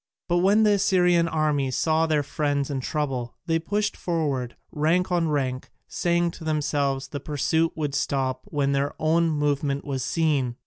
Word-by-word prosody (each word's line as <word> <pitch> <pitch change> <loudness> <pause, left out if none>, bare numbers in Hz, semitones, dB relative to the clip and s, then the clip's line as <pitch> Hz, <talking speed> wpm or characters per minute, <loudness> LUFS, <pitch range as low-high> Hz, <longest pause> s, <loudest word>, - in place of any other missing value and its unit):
But 175 -1 +2
when 200 +4 +4
the 210 - +4
Assyrian 180 -4 +3
army 150 -4 0
saw 160 +4 +1
their 150 -2 +1
friends 145 -1 -1
in 135 - -2
trouble 130 -3 -3
they 165 0 +1
pushed 205 +4 -1
forward, 145 -8 -2 0.2
rank 170 +5 +1
on 170 -2 +2
rank, 135 -4 -2 0.2
saying 170 0 0
to 165 - -11
themselves 145 -3 -1
the 145 - -5
pursuit 155 +3 0
would 150 -3 -2
stop 130 -2 -1
when 140 -2 0
their 140 +1 0
own 165 +2 +2
movement 145 -2 0
was 135 -3 -3
seen. 140 -6 0
150 Hz, 165 wpm, -25 LUFS, 140-165 Hz, 0.2 s, when